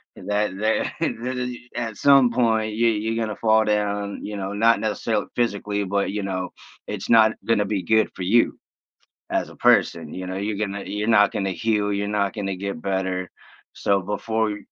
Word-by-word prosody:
That 105 -1 -2
that 110 +1 0
that 125 +3 -2
is 125 -1 -3 0.2
at 115 -3 -4
some 135 -4 +5
point, 110 -3 +1
you 115 +1 +3
you're 110 +1 -1
gonna 110 -1 -3
fall 110 -1 +3
down, 105 -1 -1
you 105 -1 -5
know, 95 +1 -4
not 115 +3 +3
necessarily 110 0 -1
physically, 105 -3 -1
but, 100 0 -1
you 105 0 -3
know, 95 -2 -3 0.4
it's 105 -2 -5
not 110 -1 +6
gonna 110 -3 +2
be 100 -2 -2
good 110 0 +3
for 90 - -5
you 115 +6 +3 0.7
as - - 0
a - - -14
person, 80 -3 +2
you 95 0 -5
know? 95 +1 -4
You're 100 +1 -2
gonna 100 -1 -3
you're 105 +2 -3
not 105 -2 +5
gonna 95 -1 -1
heal. 105 +3 0
You're 100 0 -1
not 100 -1 0
gonna 95 -3 -3
get 100 -3 -5
better. 95 -1 -2 0.4
So, 100 -1 +1
before 110 +2 -1
y 105 - -4
105 Hz, 190 wpm, -23 LUFS, 100-110 Hz, 0.7 s, not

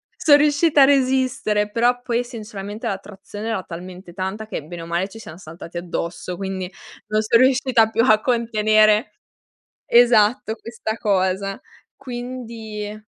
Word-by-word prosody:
Sono 290 -3 +5
riuscita 290 0 +4
a - - +8
resistere, 255 -6 +1
però 245 +3 +1
poi 240 0 -1
sinceramente 215 -3 -7
l'attrazione 205 +2 -6
era 220 -4 -1
talmente, 180 +1 -10
tanta 190 +3 -4
che 180 -8 -5
bene 170 +1 -8
o - - -8
male 175 +4 -2
ci 225 - -12
siamo 165 -6 -10
saltati 165 0 -11
addosso, 175 +1 -5
quindi 190 -1 -4 0.4
non 215 0 +1
son 225 +2 +3
riuscita 255 -3 +3
più 225 +1 +1
a 215 0 +5
contenere 215 -2 +2 0.8
esatto, 225 -2 +4
questa 225 -1 -5
cosa, 195 -1 0 0.3
quindi 230 -4 -7
215 Hz, 135 wpm, -21 LUFS, 195-240 Hz, 0.8 s, a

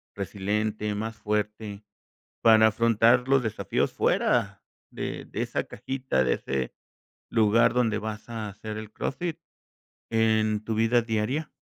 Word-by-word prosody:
resiliente, 105 +2 -2
más 110 +2 -4
fuerte, 105 -1 -3 0.6
para 110 -1 +7
afrontar 115 +2 +3
los 135 -1 +4
desafíos 110 -3 -1
fuera - - +1 0.3
de - - -5
de - - -4
esa - - -2
cajita, 130 - -2
de 65 - +2
ese 65 -2 -3 0.6
lugar 115 +2 +4
donde 115 -4 +2
vas 110 +1 -6
a 110 -2 -4
hacer 105 +2 -7
el 110 -1 -8
CrossFit 170 +3 -3 0.7
en 110 -1 +2
tu 110 - -2
vida 115 +2 +3
diaria? 115 +7 -1
110 Hz, 130 wpm, -27 LUFS, 105-115 Hz, 0.7 s, para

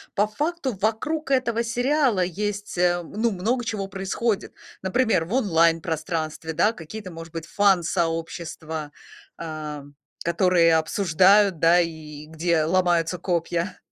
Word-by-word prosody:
по 205 0 +3
факту 295 +3 -2
вокруг 275 +8 -1
этого 235 -3 +1
сериала 245 -1 +1
есть, 205 +3 -4
э, 175 0 +2
ну, 220 +7 -1
много 225 +7 -1
чего 210 -4 -3
происходит. 195 +3 -2 0.3
Например, 220 -1 +1
в 180 - -6
онлайн-пространстве, 165 - 0
да, 205 +8 +2
какие-то, 190 +1 -9
может 165 0 -9
быть, 165 -1 -5
фан-сообщества, 165 -5 -1 0.5
ам, 150 -3 -7 0.3
которые 170 -1 +3
обсуждают, 190 +3 +3
да, 170 +2 +5
и 155 -3 -4
где 160 +1 0
ломаются 175 0 +1
копья. 175 +1 -2
180 Hz, 115 wpm, -24 LUFS, 165-210 Hz, 0.5 s, да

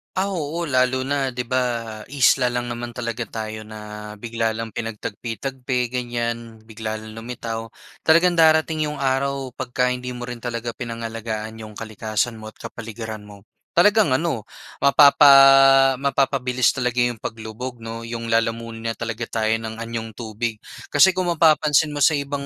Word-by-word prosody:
Ah, 190 +2 0
oo. 165 -3 -3
Lalo 130 0 +2
na 135 -1 -1
'di 125 - -2
ba, 130 +1 0 0.4
isla 130 -1 +3
lang 120 0 -2
naman 120 0 -5
talaga 120 -1 -4
tayo 110 -1 -6
na 105 0 -9
bigla 115 +1 -2
lang 115 0 -5
pinagtagpi-tagpi 120 +3 -4
ganiyan, 120 -2 -4
bigla 110 0 -5
lang 110 0 -11
lumitaw. 115 -1 -5 0.4
Talagang 170 +2 +4
darating 160 -1 +4
'yong 150 -1 -5
araw 135 0 0
'pagka 125 0 0
hindi 125 0 -4
mo 125 0 -7
rin 120 - -5
talaga 120 0 -4
pinangalagaan 115 -1 -5
'yong 110 -1 -9
kalikasan 110 +1 -3
mo 110 0 -10
at - - -19
kapaligiran 110 -2 -7
mo 100 -1 -13 0.3
talagang 205 -3 +4
ano 135 -6 -1 0.4
mapapa 140 0 +7 0.6
mapapabilis 135 -2 +1
talaga 125 -1 0
'yong 120 -1 +1
paglubog 115 +3 -7
'no, 115 0 -6
'yong 115 0 -5
lalamunin 115 0 -1
na 115 - 0
talaga 115 0 -4
tayo 110 -1 -1
ng 110 0 -7
anyong 115 -1 -5
tubig. 110 0 -4 0.3
Kasi 145 +6 +7
kung 185 0 -1
mapapansin 155 -3 +3
mo 145 - -6
sa 145 +2 +4
ibang 140 -1 -3
120 Hz, 150 wpm, -22 LUFS, 115-135 Hz, 0.6 s, mapapa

